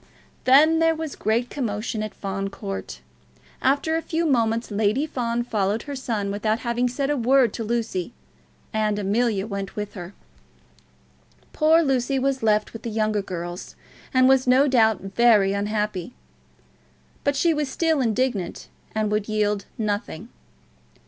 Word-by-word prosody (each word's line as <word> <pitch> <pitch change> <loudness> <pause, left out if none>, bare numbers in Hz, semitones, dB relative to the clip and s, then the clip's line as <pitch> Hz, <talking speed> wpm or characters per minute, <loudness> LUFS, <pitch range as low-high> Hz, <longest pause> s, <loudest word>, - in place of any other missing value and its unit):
Then 305 +5 +6
there 325 0 +3
was 315 -2 -5
great 230 +3 0
commotion 220 -4 -3
at 215 -1 -5
Fawn 195 0 -3
Court. 195 0 -6 0.6
After 285 +4 +2
a 325 - 0
few 330 0 -2
moments 230 -5 +1
Lady 215 +7 +1
Fawn 240 -5 -2
followed 210 -2 -1
her 285 -1 -6
son 220 -6 -2
without 215 +3 -1
having 240 +1 0
said 275 +3 -1
a - - +1
word 250 -2 +3
to 230 - -4
Lucy, 225 -4 -2 0.6
and 215 -1 0
Amelia 205 0 0
went 200 -2 -5
with 210 -1 -5
her. 180 +1 -9 1.4
Poor 320 +2 +4
Lucy 270 -1 +1
was 270 0 0
left 215 -1 +1
with 225 - -8
the 235 - -4
younger 215 -1 0
girls, 175 -2 -6 0.4
and 255 -1 +4
was 265 -1 +4
no 260 +3 +5
doubt 220 -6 +3
very 195 0 +3
unhappy. 210 -1 -2 1.1
But 285 0 +1
she 330 +4 +3
was 300 -2 -2
still 320 -1 +1
indignant, 230 -5 -1 0.3
and 215 -1 0
would 210 0 -1
yield 210 -2 0
nothing. 210 -2 -3
225 Hz, 150 wpm, -24 LUFS, 205-265 Hz, 1.4 s, Then